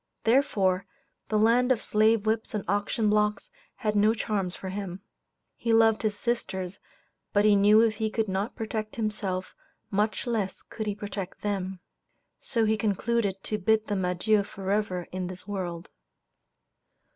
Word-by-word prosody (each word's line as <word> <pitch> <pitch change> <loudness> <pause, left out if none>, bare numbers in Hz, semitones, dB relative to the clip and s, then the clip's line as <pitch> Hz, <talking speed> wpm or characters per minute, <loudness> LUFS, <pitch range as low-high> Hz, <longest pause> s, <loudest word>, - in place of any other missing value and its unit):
Therefore, 200 -7 +2 0.4
the 215 - +2
land 235 +4 +4
of 240 - +1
slave 215 0 +3
whips 220 0 0
and 205 - -2
auction 205 +3 0
blocks 210 0 +1 0.2
had 210 -1 -1
no 210 +2 +4
charms 200 -5 -2
for 190 - -6
him. 190 -1 -5 0.5
He 230 - 0
loved 225 -1 +5
his 210 -2 -1
sisters, 190 -6 -2 0.5
but 205 0 +4
he 210 -1 +6
knew 205 +2 +6
if 225 -2 +2
he 220 -1 0
could 220 0 -1
not 195 +5 -2
protect 220 -2 -4
himself, 210 -4 -2 0.4
much 210 +5 0
less 215 -6 -2
could 220 -1 -6
he 205 - -1
protect 200 -2 -6
them. 190 -3 -3 0.6
So 230 -4 0
he 220 0 +2
concluded 205 -1 0
to 215 - -2
bid 220 +2 +2
them 200 -3 -1
adieu 180 +4 +2
forever 195 -2 -2
in 185 -1 -3
this 185 +1 -6
world. 180 -4 -4
210 Hz, 155 wpm, -27 LUFS, 190-220 Hz, 0.6 s, he